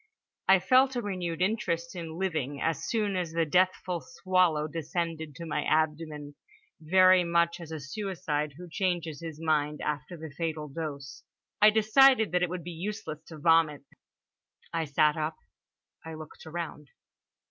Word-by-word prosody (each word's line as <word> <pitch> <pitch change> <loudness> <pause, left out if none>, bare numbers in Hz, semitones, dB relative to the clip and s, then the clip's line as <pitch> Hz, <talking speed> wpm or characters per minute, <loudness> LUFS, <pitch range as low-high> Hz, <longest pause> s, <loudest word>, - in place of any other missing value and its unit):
I 190 - +7
felt 255 +8 +4
a 245 - 0
renewed 180 -4 -2
interest 175 -5 -1
in 165 -2 -6
living 155 -7 -2
as 165 -1 -1
soon 210 -4 0
as 175 -3 -2
the 165 0 +1
deathful 180 +1 +1
swallow 185 -10 +1
descended 160 -1 -4
to 170 - -7
my 150 -2 -1
abdomen, 155 -2 -1 0.5
very 185 +3 +5
much 170 0 +1
as 165 -1 -9
a 160 - -4
suicide 150 -2 -3
who 180 - -9
changes 170 -4 -2
his 160 -2 -7
mind 150 -2 0
after 150 +4 -4
the 160 -2 -9
fatal 160 -2 -3
dose. 140 -3 -6 0.4
I 210 - +9
decided 220 +2 +5
that 180 0 +1
it 180 - +1
would 180 -1 -5
be 175 - -6
useless 175 -2 -5
to 160 - -10
vomit. 155 -2 +3 0.9
I 165 -1 0
sat 150 +2 +2
up. 155 0 -2 0.7
I 160 0 -7
looked 155 0 -11
around. 160 -3 -6
165 Hz, 155 wpm, -29 LUFS, 155-185 Hz, 0.9 s, I